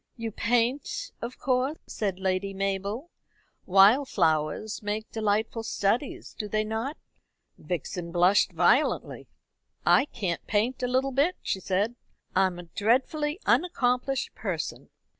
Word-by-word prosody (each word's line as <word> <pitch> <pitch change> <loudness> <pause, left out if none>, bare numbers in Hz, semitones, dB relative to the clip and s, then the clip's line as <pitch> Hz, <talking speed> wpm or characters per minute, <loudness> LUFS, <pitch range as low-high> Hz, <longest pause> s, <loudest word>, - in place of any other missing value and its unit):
"You 230 -1 -4
paint 245 - 0
of 235 +2 -5
course," 260 +4 0
said 195 -4 -3
Lady 190 +1 -1
Mabel. 195 - -2 0.6
"Wild 205 +9 +6
flowers 160 +4 0
make 210 +1 -3
delightful 220 +1 0
studies, 225 +4 -1
do 210 - -5
they 215 +1 0
not?" 225 +7 -3 0.6
Vixen 170 +1 -4
blushed 180 +3 +4
violently. 180 - +2 0.6
"I 275 - +5
can't 185 - -3
paint 225 +5 0
a 250 - +1
little 260 +2 +1
bit," 290 +8 +2
she 190 - -1
said. 195 +5 0 0.4
"I 190 0 +5
am 180 -1 -6
a 175 - -7
dreadfully 265 - 0
unaccomplished 270 -5 +1
person." - - -4
220 Hz, 125 wpm, -27 LUFS, 195-255 Hz, 0.6 s, Wild